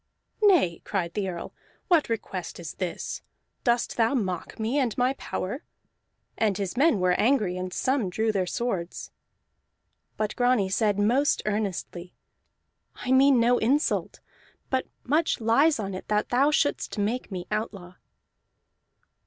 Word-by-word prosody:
"Nay," 355 - +4
cried 175 -4 -2
the 195 -2 -1
Earl, 170 -2 -6 0.3
"what 335 -8 +3
request 195 -7 -4
is 165 -3 -6
this? 180 -3 -4 0.4
Dost 240 -1 +1
thou 230 +3 +3
mock 185 -7 -3
me 230 +6 0
and 245 -5 0
my 250 +1 +2
power?" 255 - -5 0.8
And 210 -4 +2
his 195 0 -3
men 285 -3 +3
were 180 0 +3
angry, 215 -7 +2
and 185 0 -4
some 255 -1 0
drew 220 +4 0
their 190 -3 -1
swords. 185 -5 -3 1.1
But 215 -1 -2
Grani 245 -6 +2
said 205 0 +1
most 245 +8 +2
earnestly, 195 -4 -3 0.8
"I 250 - -4
mean 265 0 +6
no 240 +1 +4
insult, 280 +7 0 0.5
but 260 -1 0 0.2
much 310 +5 +1
lies 270 +7 +4
on 195 -2 -3
it 185 - -7
that 210 0 0
thou 270 +4 +3
shouldst 290 -5 0
make 215 +5 -1
me 180 -2 -4
outlaw." 200 -4 -4
220 Hz, 140 wpm, -26 LUFS, 190-260 Hz, 1.1 s, mean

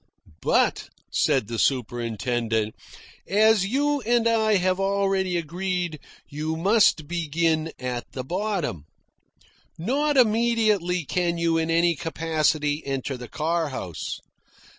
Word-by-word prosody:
"But," - - +1 0.2
said 135 -6 +2
the 115 -1 -4
superintendent, 115 -3 -1 0.5
"as 210 0 +4
you 285 +5 +1
and 235 0 +2
I 220 -2 +3
have 185 0 +1
already 195 -2 +1
agreed, 175 0 -3 0.3
you 155 +2 -3
must 195 -4 +3
begin 165 -1 0
at 125 -1 -5
the 130 - -4
bottom. 180 - -2 0.9
Not 280 - 0
immediately 215 - +2
can 175 +2 0
you 165 -1 +1
in 160 0 -1
any 170 +1 +3
capacity 155 -2 0
enter 135 0 -3
the 125 -1 -8
car 160 0 -1
house. 90 - -5
170 Hz, 115 wpm, -25 LUFS, 145-200 Hz, 0.9 s, as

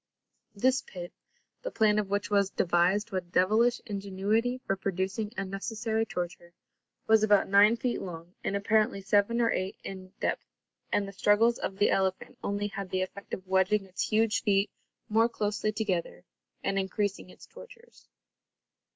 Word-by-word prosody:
This 255 +5 +2
pit, 175 -2 -9 0.5
the - - -3
plan 215 - +3
of 205 -2 -2
which 205 +1 -1
was 200 -1 +3
devised 185 +5 +1
with 180 -2 -4
devilish 220 +7 +3
ingenuity 205 +4 -1
for 195 - 0
producing 195 +3 -2
unnecessary 220 +3 -2
torture, 175 -1 -5 0.5
was 220 -1 +5
about 210 -2 +4
nine 205 +4 +6
feet 245 +1 -2
long 170 -1 -8
and 200 - -1
apparently 215 +1 +2
seven 205 +4 +2
or 230 -1 +3
eight 185 +1 -2
in 185 -1 -8
depth, - - -2 0.4
and 200 - +1
the - - -7
struggles 210 +4 +3
of 190 - -4
the 205 - +3
elephant 190 -1 -1
only 205 +1 -1
had 200 -2 -5
the 185 0 0
effect 200 +2 -9
of 185 - -14
wedging 190 +2 +2
its 185 -1 -3
huge 220 0 +2
feet 200 -1 +2 0.4
more 225 +2 +3
closely 210 -1 -1
together 200 -6 -2 0.4
and 195 0 0
increasing 195 0 -2
its - - -14
tortures. 485 -1 -15
200 Hz, 155 wpm, -29 LUFS, 190-220 Hz, 0.5 s, nine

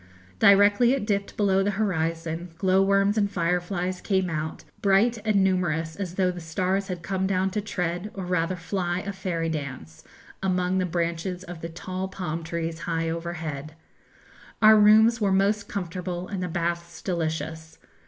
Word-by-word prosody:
Directly 205 +5 +6
it 270 -7 -1
dipped 200 -2 -2
below 195 -2 +3
the 200 - +1
horizon, 165 -3 -1
glowworms 195 +3 +3
and 200 -1 +2
fireflies 180 +1 -1
came 190 -3 0
out, 155 0 -4 0.2
bright 210 +3 +3
and 210 -3 +3
numerous 165 -4 0
as 185 -3 -5
though 185 -1 +2
the 175 - -7
stars 185 +4 -1
had 180 -2 -5
come 190 +1 -1
down 190 0 +1
to 210 - -1
tread, 180 -1 -3
or 190 -2 -4
rather 180 0 0
fly, 175 0 -2
a 200 - -5
fairy 180 -4 -2
dance 135 - -6 0.4
among 185 -1 +1
the 185 - 0
branches 170 +1 -2
of 175 -2 -9
the 165 - -5
tall 185 +3 -5
palm 175 -4 -4
trees 165 0 -3
high 165 -1 0
overhead. 160 -3 -5 0.8
Our 215 0 +8
rooms 220 +2 +6
were 200 -2 +2
most 200 +2 +1
comfortable, 180 -1 -4
and 195 -2 -4
the 180 - -1
baths 170 0 -3
delicious. 160 -2 -3
180 Hz, 160 wpm, -26 LUFS, 165-195 Hz, 0.8 s, Our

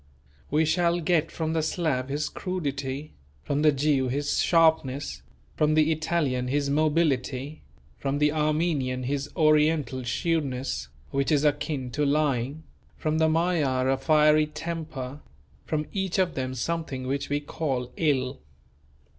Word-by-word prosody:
We 155 +2 +2
shall 170 +2 +2
get 165 -1 +1
from 160 -1 -3
the 160 - +1
Slav 155 -5 -1
his 145 +2 -1
crudity, 145 -5 -4 0.3
from 145 +1 -1
the 155 0 +6
Jew 140 -2 +1
his 140 +3 0
sharpness, 145 - +2 0.3
from 155 0 +2
the 155 0 +4
Italian 155 -5 0
his 140 +1 0
mobility, 145 -2 0 0.4
from 140 0 -1
the 150 0 +3
Armenian 150 -4 0
his 140 +2 -2
Oriental 155 -4 +3
shrewdness, 130 - -1 0.2
which 140 +2 0
is 145 -1 +3
akin 145 -3 -1
to 150 +4 -1
lying, 145 0 0 0.3
from 155 0 -1
the 160 0 +4
Magyar 155 -6 +1
a - - +3
fiery 150 +2 +4
temper; 150 -4 -6 0.5
from 155 -1 -1
each 190 -1 -1
of 185 -3 +2
them 130 -1 -3
something 140 -2 -3
which 140 +2 -2
we 145 0 +1
call 135 -4 -3
ill. 135 -4 0
150 Hz, 140 wpm, -26 LUFS, 135-160 Hz, 0.5 s, the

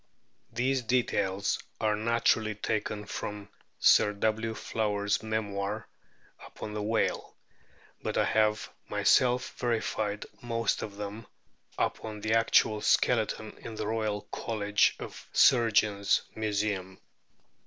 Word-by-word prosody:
These 130 +3 0
details 100 -5 0 0.2
are 110 -1 +2
naturally 110 -1 +1
taken 105 0 -2
from 105 0 -6 0.3
Sir 105 - +5
W. 110 +2 -1
Flower's 105 -2 -1
memoir 105 -1 -3 0.6
upon 105 - -8
the 105 - -3
whale, 110 +2 -1 0.7
but - - -3
I - - +4
have 110 0 +2 0.2
myself 125 0 +3
verified 110 -3 -1 0.2
most 115 -2 -1
of 100 -1 -6
them 105 +2 -6 0.5
upon 110 -1 -2
the 110 +1 0
actual 110 -1 +3
skeleton 110 -1 +1
in 115 - -8
the 110 - -3
Royal 110 -1 -1
College 105 -2 +1
of - - -9
Surgeons 110 -5 +4
Museum. 100 -3 -2
110 Hz, 110 wpm, -29 LUFS, 105-115 Hz, 0.7 s, Sir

